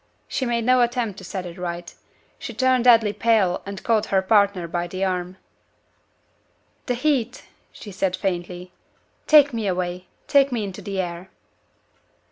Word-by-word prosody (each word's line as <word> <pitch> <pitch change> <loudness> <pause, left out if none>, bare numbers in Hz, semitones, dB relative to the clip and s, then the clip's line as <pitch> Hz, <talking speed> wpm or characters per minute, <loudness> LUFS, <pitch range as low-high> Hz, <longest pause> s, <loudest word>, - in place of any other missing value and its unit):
She 260 - -2
made 235 -1 -1
no 255 0 +4
attempt 235 -4 -1
to - - -12
set 185 0 -5
it 175 +1 -9
right 175 -1 -5 0.5
she - - -7
turned 260 -2 +2
deadly 225 -4 +5
pale 215 -6 +2
and 200 0 -7
caught 220 -2 +1
her 190 -1 +1
partner 200 -3 +2
by 175 +1 -3
the 185 +2 -4
arm. 180 0 -3 1.5
"The 250 - 0
heat!" 250 -2 -1 0.3
she 210 - -11
said, 190 -1 -1
faintly. 180 -1 -4 0.6
"Take 290 -3 +6
me 225 -3 -2
away 180 0 -3 0.2
take 280 -1 +3
me 235 -3 -1
into 195 0 -7
the 195 0 -4
air!" 175 0 -4
200 Hz, 155 wpm, -23 LUFS, 180-235 Hz, 1.5 s, Take